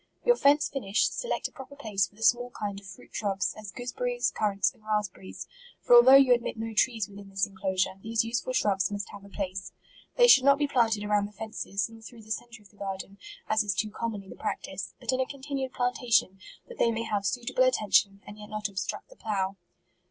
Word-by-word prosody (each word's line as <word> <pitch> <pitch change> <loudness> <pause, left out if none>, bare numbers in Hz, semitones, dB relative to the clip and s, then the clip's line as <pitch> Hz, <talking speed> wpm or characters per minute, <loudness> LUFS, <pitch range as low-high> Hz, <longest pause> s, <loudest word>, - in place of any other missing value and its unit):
Your 485 - +6
fence 290 -5 +4
finished, 215 -7 0
select - - -2
a - - -20
proper 280 -1 -11
place 205 -8 0
for - - -26
the 220 - -8
small 245 +2 +3
kind 200 -2 -3
of 200 - -15
fruit 190 - -13
shrubs, 195 -2 -1
as 215 -1 -9
goose 245 +5 -6
berries, - - -1
currants, 200 -2 +1
and 215 - -27
raspberries; 210 -3 -3 0.3
for - - +2
al 240 - +11
though 260 +2 +8
you 270 -2 +7
admit 235 -1 -2
no 225 0 -4
trees 220 -2 +1
within 200 -1 -12
this 195 +1 0
inclo 190 -1 -4
sure, 190 +1 0
these 225 +1 0
useful 235 +2 -2
shrubs 195 -6 +1
must 205 -1 -4
have 205 -1 -11
a 200 - -13
place. 190 -2 -4 0.4
They 485 -1 +6
should 275 - +8
not 280 0 +6
be 290 0 +1
planted 225 -6 +2
around 205 -1 +1
the - - -15
fen 220 +1 -8
ces, 200 0 -2
nor 225 0 -14
through 225 0 -12
the 220 - -12
centre 235 0 -5
of 200 - -19
the 205 - -25
garden, 195 0 -6 0.3
as 215 0 +3
is 205 -2 -1
too 215 +3 -1
commonly 210 -3 -4
the - - -10
practice, 190 0 -5
but - - -2
in 255 - 0
a 260 - +2
continued 270 -1 -4
plantation, 245 -6 +1 0.3
that 485 - -12
they 235 - +4
may 230 0 -1
have 205 -3 -1
suitable 245 +5 0
at 255 - +3
tention, 200 -2 +2
and 205 +1 -11
yet 210 0 -10
not 215 -1 -3
obstruct 195 -1 -4
the - - -16
plough. 195 - -2
215 Hz, 235 wpm, -28 LUFS, 200-245 Hz, 0.4 s, al